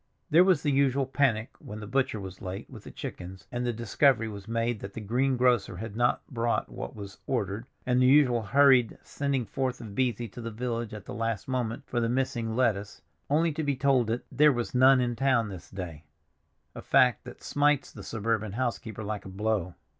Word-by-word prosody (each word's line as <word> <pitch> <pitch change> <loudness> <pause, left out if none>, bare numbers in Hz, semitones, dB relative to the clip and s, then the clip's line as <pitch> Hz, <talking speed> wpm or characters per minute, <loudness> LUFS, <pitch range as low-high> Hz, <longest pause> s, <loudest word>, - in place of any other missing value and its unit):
There 165 +4 +7
was 185 -5 +3
the 145 - +2
usual 135 0 +2
panic 130 -4 +1
when 105 +1 -8
the 105 - -7
butcher 130 0 0
was 95 -1 -9
late 95 0 -6
with - - -12
the - - -8
chickens, 90 +1 -8
and 120 0 -2
the - - +2
discovery 115 +1 +2
was 100 -1 -8
made 115 0 -1
that 100 0 -8
the - - -6
green 125 +5 0
grocer 120 -7 +2
had 110 +1 -6
not 120 +1 +1
brought 120 -2 -1
what - - -7
was 100 -1 -9
ordered, 110 -2 -2 0.2
and 125 0 +2
the 125 - +5
usual 130 -4 +5
hurried 130 0 +4
sending 140 -4 -2
forth 130 +4 -2
of 115 -3 -8
Beesy 120 -1 0
to 120 - -9
the 115 - -4
village 115 0 -3
at 105 -3 -8
the - - -7
last 115 -2 -2
moment 125 -3 -2
for 120 - -2
the 115 -1 0
missing 120 -3 -1
lettuce, 105 -8 0 0.3
only 160 +3 +3
to 155 - -3
be 145 -2 0
told 135 -3 +2
that 115 +2 -2
"there 150 +1 +5
was 120 -3 -3
none 130 +1 +6
in 120 -1 -1
town 120 -3 +2
this 95 -3 -9
day"—a 80 -4 -11
fact 130 -3 +3
that - - -11
smites 145 -1 +1
the - - -10
suburban 110 -2 -2
housekeeper 115 -3 -3
like 105 0 -4
a - - -7
blow. 95 -2 -1
120 Hz, 205 wpm, -28 LUFS, 105-130 Hz, 0.3 s, There